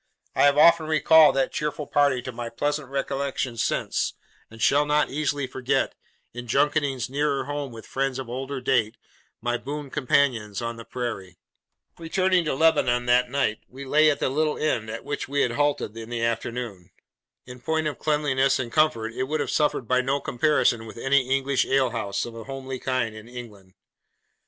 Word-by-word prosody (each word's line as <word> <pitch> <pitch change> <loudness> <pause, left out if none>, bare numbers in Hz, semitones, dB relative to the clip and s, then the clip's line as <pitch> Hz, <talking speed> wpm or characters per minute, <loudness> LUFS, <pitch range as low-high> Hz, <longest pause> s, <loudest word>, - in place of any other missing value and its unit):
I - - +4
have 145 0 +4
often 165 +1 +6
recalled 155 0 +6
that 135 -1 +1
cheerful 150 0 -3
party 140 -3 +2
to 130 - -5
my 120 0 -6
pleasant 145 +3 -2
recollection 135 -2 -2
since, 115 - -1 0.3
and 115 - -14
shall 140 +7 +4
not 150 0 +1
easily 145 -1 -1
forget, 130 0 -1 0.4
in 120 0 -7
junketings 140 0 +1
nearer 140 +1 0
home 145 -2 -4
with 115 -1 -10
friends 135 -1 -2
of 130 -2 -5
older 130 +3 -4
date, 125 -5 +1 0.4
my 120 +1 0
boon 145 +1 -6
companions 130 -8 +1
on 115 0 -4
the 115 - -10
Prairie. 100 -8 -5 0.6
Returning 185 +2 +1
to 150 - -1
Lebanon 135 -6 +3
that 125 0 +3
night, 130 -5 0
we 135 +2 -10
lay 155 +3 +4
at 145 - 0
the - - 0
little 150 +3 0
inn 115 -8 -1
at 115 +1 -6
which 145 - -4
we 140 +1 0
had 120 - 0
halted 145 -5 0
in 115 0 -8
the 120 -1 -3
afternoon. 115 -5 -3 0.6
In 125 0 -10
point 160 +3 -1
of 150 - -3
cleanliness 140 -3 +1
and 120 -2 -4
comfort 115 -8 +1
it 130 - -2
would 155 +3 -2
have - - -2
suffered 150 -6 +1
by 130 0 +3
no 135 +2 0
comparison 120 -5 +1
with 110 - -11
any 135 +1 +2
English 135 0 +1
alehouse, 115 -7 0
of 120 - -8
a 115 - -8
homely 135 -1 -6
kind, 130 -4 -1
in 110 +1 -11
England. 105 -6 -11
135 Hz, 180 wpm, -25 LUFS, 120-145 Hz, 0.6 s, often